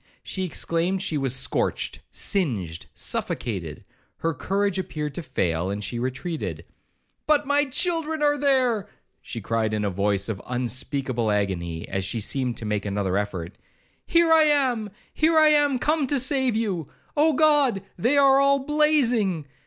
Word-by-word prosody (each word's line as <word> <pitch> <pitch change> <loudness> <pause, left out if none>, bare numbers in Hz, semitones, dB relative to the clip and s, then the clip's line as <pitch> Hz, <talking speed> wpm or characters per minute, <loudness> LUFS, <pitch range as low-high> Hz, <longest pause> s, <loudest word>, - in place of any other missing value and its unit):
She 190 - -3
exclaimed 175 +2 -1
she 160 - -2
was 135 -2 0
scorched, 130 - -1
singed, 105 - -2
suffocated; - - -3 0.4
her 165 0 0
courage 195 +6 -1
appeared 150 -5 -4
to 175 - -4
fail, 85 - -1
and 100 +1 -4
she 120 +3 -4
retreated. 135 +7 -4 0.6
'But 295 -1 +3
my 285 +1 +2
children 320 +2 -1
are 290 0 +4
there!' 260 -7 +1 0.3
she 115 - -6
cried 110 +1 -1
in 105 -1 -1
a 100 - 0
voice 100 +1 0
of 105 -4 -4
unspeakable 125 -1 -1
agony, 90 -5 -2
as 95 0 -2
she 100 +5 -2
seemed 125 +3 -1
to 115 - -5
make 105 -1 -2
another 100 -2 -1
effort; 100 -3 -3 0.5
'here 335 -1 +4
I 320 -1 +6
am—here 275 - +1
I 310 -1 +7
am 290 -3 +3
come 300 +2 +1
to 285 - +1
save 260 -2 +1
you.—Oh 225 - -1
God! 290 -8 +3
They 245 +10 +1
are 275 -1 +6
all 275 0 +4
blazing! 265 - +2
185 Hz, 150 wpm, -24 LUFS, -, 0.6 s, I